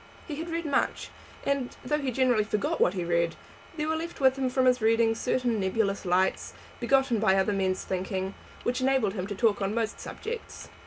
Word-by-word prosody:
He 295 -3 -5
had 330 +2 -5
read 335 0 -2
much, 290 - 0 0.4
and, 280 -3 -1
though 300 +3 +1
he 275 -3 -2
generally 250 -3 +3
forgot 210 -1 -1
what 180 - +3
he 180 -2 -2
read, 170 -1 +1 0.4
there 300 0 -1
were 315 - +1
left 335 +2 -5
with 265 -1 +4
him 265 -1 0
from 260 0 +1
his 250 -1 +4
readings 225 0 +3
certain 245 -3 0
nebulous 200 +1 0
lights, 185 +2 +1 0.2
begotten 250 -1 +2
by 205 -3 +4
other 195 +2 +2
men's 190 -1 0
thinking, 190 +1 -2 0.3
which 250 +1 -1
enabled 260 -6 +2
him 190 -2 -3
to 205 - -4
talk 210 -1 +2
on 195 +2 -1
most 225 -1 -1
subjects. 465 +1 -7
225 Hz, 200 wpm, -28 LUFS, 195-265 Hz, 0.4 s, with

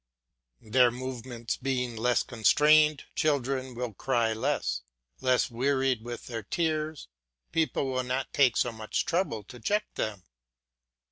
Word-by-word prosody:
Their 125 +3 +4
movements 120 -1 -5
being 125 -3 -2
less 120 +2 +2
constrained, 150 +5 +4
children 135 -3 0
will 120 -2 -4
cry 115 +1 +1
less; 110 - -1 0.4
less 130 -1 +2
wearied 130 0 +1
with 120 +1 -7
their 115 -2 -5
tears, 155 - -2 0.4
people 160 -4 +1
will 130 0 0
not 130 +1 -3
take 135 -4 +4
so 120 - +2
much 110 -1 -2
trouble 170 - -1
to 120 +4 -12
check 210 - -1
them. 105 -4 -3
125 Hz, 130 wpm, -28 LUFS, 115-140 Hz, 0.4 s, Their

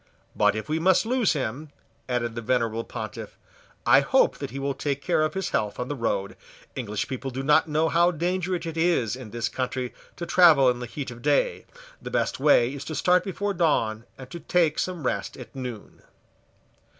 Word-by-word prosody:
"But - - +3
if 110 - -4
we 155 +1 -1
must 185 +5 +3
lose 245 -3 +2
him," 145 +1 -4 0.4
added 120 -2 -1
the 115 - -5
venerable 115 -1 0
Pontiff, 110 -2 -7 0.5
"I - - +7
hope - - +2
that - - -4
he 130 - -7
will 140 0 -1
take 140 0 -2
care 150 - +1
of 155 +4 0
his 190 - -2
health 105 -1 -1
on 125 - -3
the 145 - -2
road. 100 -5 -2 0.4
English 105 -5 -3
people 135 +1 -4
do 130 +1 -5
not 150 +3 +4
know 155 +2 +2
how 170 +2 +4
dangerous 180 +1 -2
it 165 0 -5
is 160 - +1
in 125 -4 -9
this 115 +1 -2
country 125 0 -3 0.2
to 170 - -5
travel 155 -8 +6
in 120 - -5
the 125 - -5
heat 130 +2 -6
of 120 - -9
the - - -14
day. - - +1 0.4
The - - -6
best - - -1
way 135 -3 +4
is 140 -1 -6
to 155 - -5
start 180 +3 +3
before 200 +1 -2
dawn, 115 - +1
and 130 - -10
to 170 - -6
take 165 -3 +1
some 180 -6 -3
rest 100 -5 -2
at 120 -3 -11
noon." 125 -5 -7
135 Hz, 205 wpm, -25 LUFS, 120-170 Hz, 0.5 s, I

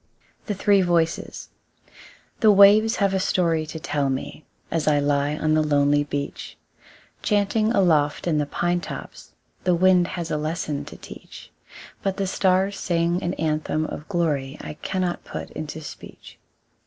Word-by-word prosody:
The 205 - -2
Three 200 0 +3
Voices 170 -2 -1 0.9
The 220 - +5
waves 205 +3 +6
have 200 -4 +1
a 190 - +1
story 165 -4 +1
to 160 +1 -7
tell 150 -4 -1
me, 135 +3 -5 0.3
As 160 -2 -1
I 150 -1 +4
lie 145 +1 +1
on 155 0 +1
the 155 - +3
lonely 145 -1 +2
beach; 145 -1 -5 0.6
Chanting 210 +1 +1
aloft 160 -9 +2
in 160 -4 +1
the 145 - -1
pine 175 +3 0
tops, - - -9 0.3
The 180 -1 +3
wind 180 0 +4
has 170 -1 -4
a 150 - 0
lesson 155 -1 -3
to - - -11
teach; - - -12 0.5
But 195 -1 -2
the 200 - -1
stars 190 +1 +1
sing 170 0 0
an 175 -1 -2
anthem 155 0 -1
of 155 +2 -8
glory 150 -7 -1
I - - -7
cannot 180 +2 -3
put - - -7
into 155 0 -6
speech. 150 - -12
170 Hz, 155 wpm, -23 LUFS, 150-190 Hz, 0.9 s, waves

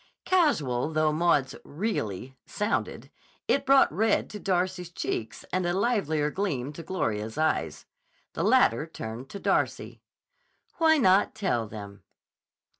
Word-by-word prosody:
Casual 155 - +2
though 155 0 +2
Maud's 150 -5 +2
"really" 130 - -4
sounded, 210 +2 -2 0.4
it 275 - +1
brought 270 - +5
red 220 +6 +1
to 210 - -7
Darcy's 180 -2 -1
cheeks 115 -9 -4
and 185 0 +1
a 175 0 0
livelier 160 -9 0
gleam 150 -9 -2
to 165 - -8
Gloria's 110 - -3
eyes. 80 - -1 0.5
The - - -3
latter 120 +8 +3
turned 120 -4 -7
to 200 - -7
Darcy. - - -1 0.8
"Why 320 -1 +5
not 195 -6 +3
tell 180 - -1
them?" 100 -2 -9
160 Hz, 125 wpm, -27 LUFS, 125-200 Hz, 0.8 s, brought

